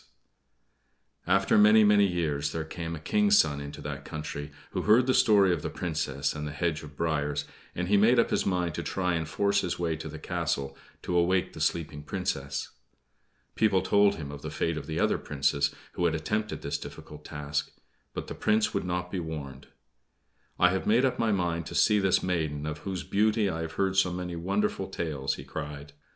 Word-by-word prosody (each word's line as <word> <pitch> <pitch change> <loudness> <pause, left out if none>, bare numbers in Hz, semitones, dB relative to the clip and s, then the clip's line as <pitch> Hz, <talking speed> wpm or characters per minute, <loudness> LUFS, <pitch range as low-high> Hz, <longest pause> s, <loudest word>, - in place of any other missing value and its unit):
After 95 +3 +4
many, 105 +1 +7
many 105 -1 +5
years 75 -5 -1
there 80 - -2
came 85 +1 -5
a - - -7
King's 210 - +3
son 70 - +3
into 70 0 -8
that 70 -1 -5
country, 75 -1 -6 0.2
who - - -2
heard 115 +4 +5
the 130 - +2
story 100 -6 +5
of 85 - -2
the - - -3
Princess 75 -4 -2
and 75 0 -5
the - - -5
hedge 80 0 -1
of 75 -1 -12
briers; 75 -3 -1 0.3
and 90 0 -2
he 100 +2 +4
made 115 +5 +5
up 115 - +3
his - - +2
mind 90 -3 0
to - - -3
try 90 -2 -1
and 80 -2 -2
force 100 +3 +2
his 90 - -2
way 85 -2 -1
to 80 - -7
the - - -7
castle 70 0 -2 0.3
to 90 - -2
awake 90 +2 +2
the - - -8
sleeping 75 -3 -1
Princess. 70 -1 -3 0.8
People 100 -4 +2
told 100 +1 +4
him 75 -6 -6
of 75 0 -8
the - - -5
fate 85 - -1
of 80 - -6
the 80 0 -2
other - - +2
Princes, 70 0 +1 0.2
who 90 - -1
had 80 -1 +2
also 80 - -4
attempted 105 +5 -2
this - - -2
difficult 75 0 -10
task; 75 -1 -3 0.5
but - - -4
the - - -6
Prince 110 0 +1
would - - -1
not 90 0 -2
be 95 - -2
warned. 75 -5 -6 0.9
"I 90 0 +5
have 95 - -2
made 115 +5 +4
up 130 - 0
my 115 -1 +2
mind 85 -4 -1
to - - -7
see 105 -1 +4
this 95 -2 +2
maiden 80 -5 -1
of 75 0 -4
whose 95 0 -4
beauty 105 0 +2
I 80 - -3
have 80 -1 -5
heard 95 -1 0
so 95 -2 +4
many 90 0 -4
wonderful 95 +3 -1
tales," 75 -7 -2
he - - -9
cried. 75 -1 -7
85 Hz, 205 wpm, -28 LUFS, 75-95 Hz, 0.9 s, many